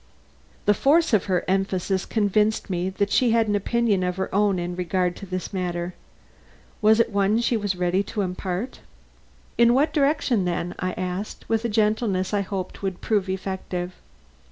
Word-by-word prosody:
The 205 - +5
force 295 - +3
of 210 - +3
her 185 -3 0
emphasis 190 0 0
convinced 210 -1 +1
me 180 +1 -1
that 200 +1 -1
she 250 - +3
had 225 -1 +3
an 205 - +1
opinion 215 -1 +1
of 180 0 -1
her 190 - -3
own 200 -1 +3
in 175 0 -3
regard 180 0 0
to 200 - -9
this 185 +2 -4
matter. 175 -1 -2 0.9
Was 220 +1 +5
it 230 - +2
one 200 +2 +2
she 235 0 +1
was 205 -3 -1
ready 180 +1 +1
to 210 - -3
impart? 185 +5 -3 0.8
"In 235 +1 +6
what 285 +4 +2
direction, 280 - +2
then?" 175 0 -2
I 185 0 -2
asked, 185 +3 -5
with 225 0 0
a - - +1
gentleness 210 -3 +1
I 205 - +2
hoped 190 -1 -5
would 190 -2 -3
prove 205 -3 0
effective. 185 -1 -4
195 Hz, 175 wpm, -24 LUFS, 185-215 Hz, 0.9 s, In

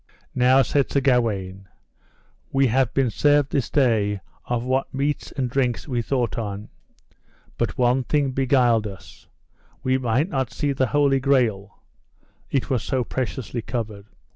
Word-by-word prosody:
Now, 130 +2 +4
said 140 +3 0
Sir 140 - +1
Gawaine, 105 -8 0 0.8
we 135 0 +3
have 130 0 +2
been 135 -4 +1
served 145 +3 +2
this 135 -5 -1
day 110 -7 +2 0.3
of 120 -1 -2
what 130 +2 -1
meats 140 +2 -2
and 130 -3 -2
drinks 125 0 -1
we 125 -4 -1
thought 125 0 -1
on; 105 -1 -5 0.9
but - - -2
one 125 +1 +2
thing 145 -1 +1
beguiled 125 -4 +2
us, 95 -2 -12 0.6
we 130 0 +1
might 125 +5 +1
not 130 - -2
see 145 +5 -1
the 130 -1 +1
Holy 140 0 +2
Grail, 120 -7 0 0.7
it 135 - 0
was 130 -3 0
so 130 -2 -1
preciously 125 -1 -4
covered. 110 -4 -5
125 Hz, 145 wpm, -23 LUFS, 115-135 Hz, 0.9 s, Now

